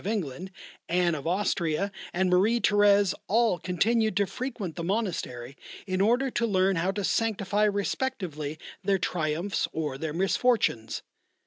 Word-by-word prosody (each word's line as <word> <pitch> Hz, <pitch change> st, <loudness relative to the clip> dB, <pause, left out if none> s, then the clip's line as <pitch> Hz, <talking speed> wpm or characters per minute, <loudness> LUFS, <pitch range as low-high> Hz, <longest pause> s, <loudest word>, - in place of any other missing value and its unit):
of -, -, -7 dB
England, 185 Hz, -, -3 dB, 0.4 s
Anne 175 Hz, 0 st, +2 dB
of 145 Hz, 0 st, -4 dB
Austria, 180 Hz, 0 st, 0 dB, 0.2 s
and 185 Hz, +1 st, +1 dB
Marie 195 Hz, +6 st, +3 dB
Thérèse, 205 Hz, -2 st, +4 dB
all 225 Hz, -3 st, +2 dB
continued 215 Hz, +5 st, +1 dB
to 200 Hz, -, +3 dB
frequent 230 Hz, -7 st, -5 dB
the 170 Hz, -, -4 dB
monastery 165 Hz, -, -3 dB, 0.3 s
in 185 Hz, -1 st, -1 dB
order 245 Hz, +6 st, +2 dB
to 235 Hz, -1 st, 0 dB
learn 190 Hz, -2 st, +2 dB
how 170 Hz, +3 st, 0 dB
to 200 Hz, +1 st, -2 dB
sanctify 210 Hz, -1 st, +1 dB
respectively 195 Hz, -, -2 dB, 0.3 s
their 195 Hz, 0 st, +2 dB
triumphs 170 Hz, +2 st, -1 dB
or 150 Hz, -4 st, -3 dB
their 160 Hz, 0 st, -3 dB
misfortunes. 190 Hz, -, +1 dB
190 Hz, 140 wpm, -27 LUFS, 170-210 Hz, 0.4 s, Thérèse